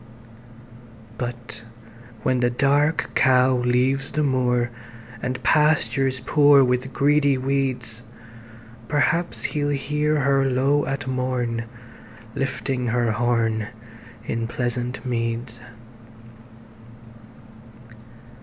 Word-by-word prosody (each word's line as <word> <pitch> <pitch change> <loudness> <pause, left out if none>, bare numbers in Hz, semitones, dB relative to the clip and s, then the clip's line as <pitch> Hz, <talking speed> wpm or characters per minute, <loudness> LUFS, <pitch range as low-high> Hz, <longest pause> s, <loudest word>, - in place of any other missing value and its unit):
But 120 -2 -6 0.6
when 130 - +1
the 120 0 +2
Dark 145 +5 +1
Cow 130 -1 +4
leaves 125 +2 +1
the 150 - 0
moor, 125 -3 +1 0.5
And 125 0 -4
pastures 140 -4 +2
poor 145 +1 +5
with 125 +1 0
greedy 140 -1 +2
weeds, 130 -4 -2 0.9
Perhaps 170 +6 0
he'll 145 -2 -1
hear 150 +1 0
her 135 0 +2
low 135 +3 +1
at 135 -1 -3
morn, 125 -3 -2 0.7
Lifting 130 -1 -2
her 120 -1 +1
horn 115 -1 0 0.6
in 115 0 -2
pleasant 125 +1 -3
meads. 115 -1 -3
130 Hz, 90 wpm, -23 LUFS, 120-140 Hz, 0.9 s, poor